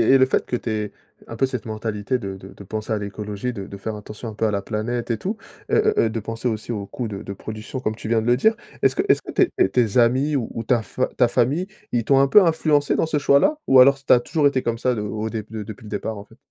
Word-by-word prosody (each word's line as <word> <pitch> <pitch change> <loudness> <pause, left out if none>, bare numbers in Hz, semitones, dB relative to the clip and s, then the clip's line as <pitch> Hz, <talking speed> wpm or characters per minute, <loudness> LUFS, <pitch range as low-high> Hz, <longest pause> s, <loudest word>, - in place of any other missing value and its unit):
et - - +8
le 130 - +5
fait 130 - 0
que 125 - -1
tu 120 - -5
aies 105 -1 -2 0.4
un 115 - -8
peu 135 - +3
cette 130 -3 -5
mentalité 110 +2 -2
de 100 -4 -5
de 95 0 -12
de 100 - -12
penser 110 +2 -5
à 110 - +1
l'écologie, 105 +3 -4
de 100 -4 -6
de 100 - -9
faire 105 +3 -5
attention 105 +2 -8
un 110 - -6
peu 110 - -1
à - - 0
la 100 -1 -1
planète 115 +4 -3
et 115 - 0
tout. 205 - -3 0.3
Heu - - +4
heu 435 0 +3
heu, - - -2
de 115 - -3
penser 115 +3 -3
aussi 110 +2 -4
au 100 -3 -5
coût 120 - -4
de 100 -2 -6
de - - -7
production 110 +5 -6
comme 110 -3 -2
tu 110 - -7
viens 115 -1 +3
de 110 - -4
le 120 - +5
dire. 220 - +3 0.3
Est-ce 130 -1 +2
que - - +2
est-ce - - +4
que - - -8
tes - - +3
tes - - +1
tes 120 -3 +1
amis 130 +5 +3
ou 115 -3 -3
ta 120 -3 +3
fa 130 +5 -2
ta 125 -2 +4
famille, 145 +11 +1 0.3
ils 120 -1 +1
t'ont 135 +4 +4
un 140 - +5
peu 205 +8 +7
influencé 155 -3 +2
dans - - +2
ce 160 -1 -1
choix-là? 145 - +3
Ou 130 - +7
alors 135 +2 +8
s 140 0 -20
tu - - +2
as 125 - +8
toujours 150 +5 0
été 140 -2 +3
comme 115 -1 -2
ça 125 +2 +1
de 115 - -3
au 105 +1 -3
déb 110 -2 -4
de 110 -1 -5
depuis 105 +1 -10
le - - -9
départ 105 +1 -4
en 100 - -9
fait? - - -20
115 Hz, 300 wpm, -22 LUFS, 105-130 Hz, 0.4 s, et